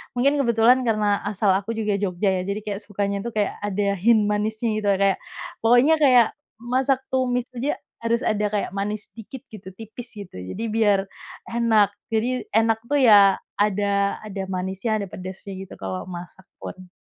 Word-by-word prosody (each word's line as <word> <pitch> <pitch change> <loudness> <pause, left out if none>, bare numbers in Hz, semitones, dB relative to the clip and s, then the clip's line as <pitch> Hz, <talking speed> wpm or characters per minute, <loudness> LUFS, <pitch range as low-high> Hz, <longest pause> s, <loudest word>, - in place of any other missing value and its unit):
mungkin 280 +4 +2
kebetulan, 235 0 +4
karena 210 -2 +2
asal 205 -1 +1
aku 200 +4 -1
juga 210 -3 -1
Jogja, 195 0 0
ya, - - -1
jadi 200 +1 -2
kayak 205 -1 -4
sukanya 200 -1 -3
tuh 235 +2 -6
kayak, 205 -2 -1
ada 205 0 -1
hint 220 +2 +4
manisnya 215 +2 -1
gitu, 205 - -3
ya, 195 -1 +3
kayak 195 -1 +3 0.4
pokoknya 245 +7 +5
kayak, 250 -6 +6 0.3
masak 255 +3 +1
tumis 250 -1 0
aja 270 +5 -2 0.2
harus 230 0 +1
ada 210 -1 +1
kayak 205 -2 -2
manis 205 +2 -4
dikit, 235 +4 -10
gitu, 190 -3 -11
tipis, 225 +3 -9
gitu. 200 - -10
Jadi 95 - -6
biar 205 -3 +3 0.4
enak, 225 -3 +3 0.2
jadi 240 +3 -1
enak 225 0 +3
tuh, 290 +1 +2
ya, 205 -4 +7 0.2
ada 200 -1 +1
ada 200 -2 -5
manisnya, 190 +4 -2
ada 205 -2 -3
pedasnya, 185 +2 -8
gitu, 190 -1 -9
kalau 95 -1 -5
masak 180 +1 -9 0.2
pun. 185 -1 -9
210 Hz, 170 wpm, -23 LUFS, 200-230 Hz, 0.4 s, ya